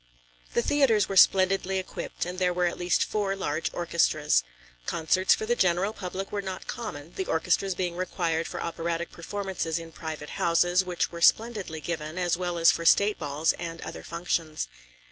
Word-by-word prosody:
The - - +3
theatres 245 -9 +3
were 195 - -4
splendidly 190 0 +4
equipped 185 -2 -4
and 180 +1 -5
there 180 -1 +1
were 180 0 +2
at 175 - -2
least 175 0 +2
four 200 -2 -1
large 160 -4 -2
orchestras. 170 - +2 0.4
Concerts 185 +4 +3
for - - -4
the 240 +2 +1
general 185 +1 +2
public 190 -1 -5
were 205 - -2
not 190 -1 -6
common, 175 -9 -6
the 190 - -2
orchestras 180 +3 +1
being 175 -1 -2
required 170 -2 -1
for - - -6
operatic 170 0 -3
performances 185 -2 -3
in 165 -1 -7
private 155 -2 -7
houses, 175 +2 +3
which 180 -1 -2
were 170 -1 -7
splendidly 205 -6 +2
given, 160 -1 -4
as 175 -2 +1
well 175 -1 -3
as 165 0 +6
for 170 - -3
state 200 +5 +4
balls 150 +1 +1
and 165 -1 -5
other - - -7
functions. 165 - -2
175 Hz, 175 wpm, -27 LUFS, 165-190 Hz, 0.4 s, as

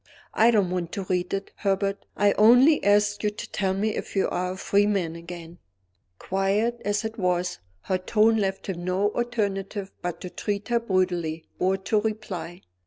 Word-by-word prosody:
"I 225 +2 +5
don't 205 -6 +2
want 175 -2 -2
to 195 - -3
read 180 -1 -1
it, 195 0 -3
Herbert. 195 0 -1
I 205 0 +4
only 245 +9 +6
ask 205 0 +3
you 210 - +1
to 210 - -8
tell 190 -1 0
me 210 +2 0
if - - -6
you 195 - +2
are 180 0 -2
a - - -9
free 200 +2 +2
man 180 -6 0
again." 170 0 -9 0.6
Quiet 200 - 0
as 205 +2 0
it 220 +1 -5
was, 180 - 0 0.2
her 185 -1 -1
tone 220 +4 +3
left 195 -2 -1
him 175 -3 -4
no 190 +3 +1
alternative 205 -4 -2
but 175 -1 -4
to 180 - -7
treat 205 +1 -3
her 235 0 +3
brutally 180 -6 -1
or 190 +1 +2
to 200 +2 0
reply. 210 -5 -4
195 Hz, 180 wpm, -25 LUFS, 180-210 Hz, 0.6 s, only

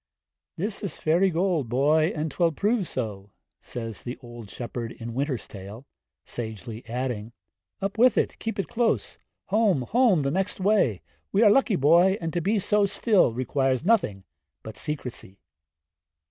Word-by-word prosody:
I. 170 - -4
'This 205 -1 -3
is 195 -7 -4
fairy 175 +5 +3
gold, 170 -7 0
boy, 150 +6 +3
and 155 0 -2
'twill 170 -2 +1
prove 205 - 0
so,' 105 -5 -4 0.3
says 115 -4 -6
the 120 +1 -6
old 120 -4 -11
shepherd 120 0 -5
in 115 0 -7
'Winter's 135 -1 -2
Tale;' 100 +6 -10 0.4
sagely 110 0 -6
adding, 120 -2 -3 0.5
'Up 200 +2 -2
with 250 +2 +5
it, - - 0
keep 225 -1 -4
it 195 - -2
close; 235 -1 0 0.3
home, 205 - +3
home, 215 - +3
the 140 - 0
next 195 +5 -1
way. 185 - +2 0.3
We 205 - +4
are 210 - +7
lucky, 230 -3 +3
boy, 175 +6 +5
and 165 -2 -4
to 175 - 0
be 205 +6 +1
so 205 +1 +2
still, 200 - +3
requires 130 +3 0
nothing 180 - +2 0.4
but 110 -1 -8
secrecy.' 130 - -5
150 Hz, 160 wpm, -26 LUFS, 120-195 Hz, 0.5 s, are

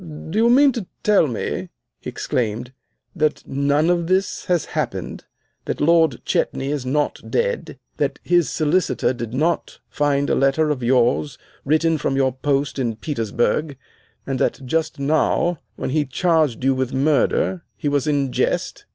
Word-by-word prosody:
"Do 160 +4 -5
you 230 +1 +4
mean 275 +3 +6
to 230 -7 -5 0.2
tell 205 -6 +4
me," 120 -5 -3 0.3
he - - -6
exclaimed, 120 +1 -2 0.4
"that 155 -1 0
none 145 +4 +2
of 170 -1 0
this 190 +1 0
has 175 -3 +1
happened? 120 - -3 0.4
That - - -3
Lord 160 -4 +3
Chetney 135 +1 -1
is 140 -4 -3
not 145 +3 0
dead, 485 +1 -1 0.2
that - - -1
his 175 -3 +2
Solicitor 155 -3 +1
did 120 -3 -6
not 155 +7 -1
find 145 -1 +1
a - - +1
letter 145 +3 +2
of 135 -4 -2
yours 125 +3 +2 0.3
written 155 +2 +2
from 135 - -1
your 135 -1 +2
post 140 +2 -1
in 120 -4 -1
Petersburg, 120 +3 -1 0.5
and 135 -2 -2
that 135 - -1
just 160 +4 -1
now, 155 +3 +1 0.2
when - - -4
he 150 +1 +2
charged 155 -4 +1
you 135 0 +3
with 130 -1 -2
murder, 155 +5 +1
he 150 - -3
was 145 -1 +1
in 140 -3 +1
jest?" - - -1
145 Hz, 160 wpm, -21 LUFS, 130-165 Hz, 0.5 s, mean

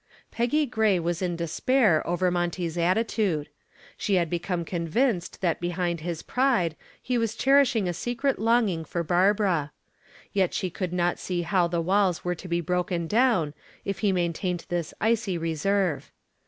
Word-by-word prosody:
Peggy 245 +6 +1
Gray 220 -6 +2
was 170 0 -2
in 180 -2 -1
despair 170 - +2
over 175 +1 +1
Monty's 175 -1 -2
attitude. 180 -3 0 0.5
She 200 - 0
had 170 -3 +1
become 175 0 -2
convinced 175 - -1
that 175 -4 +1
behind 175 -1 -1
his 165 0 -5
pride 240 - +1 0.2
he 250 -1 -1
was 230 -1 -1
cherishing 265 -7 +3
a 175 - -1
secret 245 - -1
longing 220 -7 +2
for 170 +2 -3
Barbara. 180 -3 +2 0.6
Yet 190 -3 +1
she 185 -3 -2
could 180 0 -3
not 175 -1 0
see 175 -2 -2
how 175 0 +2
the 170 0 -1
walls 185 0 +1
were 180 - +1
to 180 +2 -9
be 170 0 0
broken 175 0 -1
down 215 - +2 0.3
if 195 - -3
he 205 -3 +2
maintained 175 0 -1
this 175 -3 -2
icy 220 -4 +1
reserve. 165 +1 -1
180 Hz, 155 wpm, -26 LUFS, 170-215 Hz, 0.6 s, cherishing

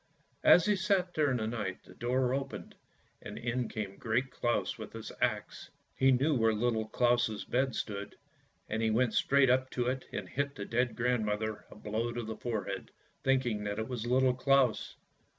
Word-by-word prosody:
As 175 - +7
he 210 - +3
sat 190 -2 +1
there 150 -2 +2
in 130 - +1
the 110 - -2
night, 105 -5 -3
the - - -15
door 125 +1 0
opened, 135 0 -4 0.5
and - - -8
in 120 0 -2
came 100 -3 -5
Great 120 +3 -1
Claus 120 -1 0
with - - -8
his - - -7
axe; - - -1 0.3
he 135 0 +4
knew 135 +5 +3
where 115 -4 +3
Little 110 -1 0
Claus' 120 -2 +1
bed 130 +1 0
stood, 100 -1 -4 0.5
and 110 +1 -2
he 110 - +2
went 115 +1 +2
straight 135 +6 +4
up 130 +1 +2
to 125 -2 -1
it 130 +1 -2
and - - -4
hit 140 +1 -2
the 100 - -5
dead 120 +2 0
grand 125 -1 +1
mother 105 0 -2
a - - -13
blow 110 +2 -2
on 120 -1 -4
the 110 0 -5
forehead, 105 -5 -4 0.3
thinking 125 -6 +1
that 100 0 -2
it 110 0 -2
was 120 -2 -4
Little 130 +1 +4
Claus. 130 -4 +2
120 Hz, 190 wpm, -31 LUFS, 110-130 Hz, 0.5 s, As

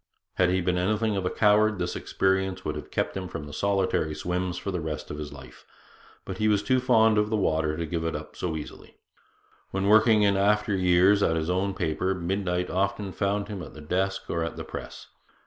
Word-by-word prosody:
Had 90 -1 +2
he 95 +1 +1
been 90 0 0
anything 110 +3 +1
of 95 -2 -1
a - - +1
coward, 105 +1 +3
this 90 -1 -2
experience 95 0 0
would - - -2
have - - -7
kept - - -2
him 95 -1 -4
from 75 -4 -7
solitary 95 -5 0
swims 90 +2 -2
for 90 +2 -4
the 90 -2 -2
rest 75 -2 -5
of 75 - -6
his 75 -1 -6
life. 65 -4 -13 0.6
But 95 -1 -6
he 110 - +2
was 105 -1 +2
too 130 +5 +2
fond 110 -4 +4
of 105 0 +1
the 110 - +1
water 80 -5 0
to 85 - -2
give 80 +1 -3
it 80 - -2
up - - -7
so 80 -3 -3
easily. 75 - -10 0.7
When 95 0 -2
working 110 +1 +5
in 100 -1 +3
after 105 +1 +2
years 95 +2 +4
at 80 - +2
his 80 +1 -1
own 95 +1 0
paper, 90 +2 -1
midnight 90 0 -2
often 100 +1 -1
found 100 +1 -1
him 100 -3 -6
at 80 - -10
the - - -10
desk 95 +5 -1
or 85 -1 -1
at 85 - -4
the - - -6
press. - - -8
95 Hz, 215 wpm, -26 LUFS, 85-100 Hz, 0.7 s, working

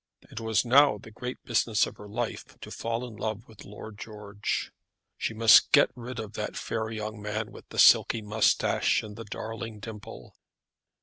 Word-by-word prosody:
It - - -6
was 110 0 +1
now 135 -1 +5
the 110 - -13
great 125 +3 -7
business 115 -2 +2
of - - -10
her 105 - -11
life 115 +2 -5
to - - -9
fall 115 +2 -3
in 110 -3 -11
love 110 +1 -4
with 110 -3 -14
Lord 105 +1 -10
George. 105 -2 -4 0.4
She 110 - -3
must 115 0 +7
get - - +5
rid 125 0 -8
of 110 -2 -6
that - - -4
fair 110 0 -3
young 110 -1 -5
man 105 +1 -4
with - - -14
the - - -10
silky 110 - +6
moustache 105 +1 +2
and 105 -1 -9
the 115 +1 -8
darling 110 +1 -6
dimple. 105 0 -10
110 Hz, 180 wpm, -28 LUFS, 105-115 Hz, 0.4 s, must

